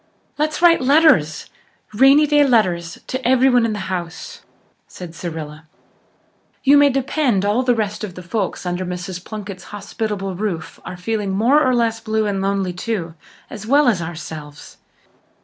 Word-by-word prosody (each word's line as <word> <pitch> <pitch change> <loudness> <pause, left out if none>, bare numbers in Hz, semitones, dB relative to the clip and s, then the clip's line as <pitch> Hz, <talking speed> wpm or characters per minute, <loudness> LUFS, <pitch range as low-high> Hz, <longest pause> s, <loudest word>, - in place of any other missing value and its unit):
"Let's 305 +3 -1
write 335 -3 +6
letters 265 - +3 0.5
rainy 270 +6 +6
day 295 0 +4
letters 185 -10 +1
to 260 - -4
everyone 250 -1 +3
in 220 - -2
the 205 -2 -5
house," 170 -1 -9 0.5
said 175 -3 -10
Cyrilla. 160 -2 -7 1.0
"You 280 +1 +6
may 285 0 +6
depend 260 -6 0
all 210 +5 +2
the 250 -1 +2
rest 215 -1 -3
of 190 -4 -6
the 180 - -9
folks 190 0 -3
under 180 +1 -2
Mrs. 180 0 -6
Plunkett's 200 -4 -8
hospitable 205 -1 -4
roof 180 -3 -4
are 180 - -7
feeling 210 +2 -2
more 235 +10 +3
or 255 -1 +2
less 230 -1 0
blue 220 -1 -1
and 200 -2 -1
lonely 195 -2 -1
too, 180 -3 -4 0.3
as 215 0 -9
well 285 +2 +4
as 205 -8 +2
ourselves. 155 -3 -8
210 Hz, 155 wpm, -19 LUFS, 180-250 Hz, 1.0 s, write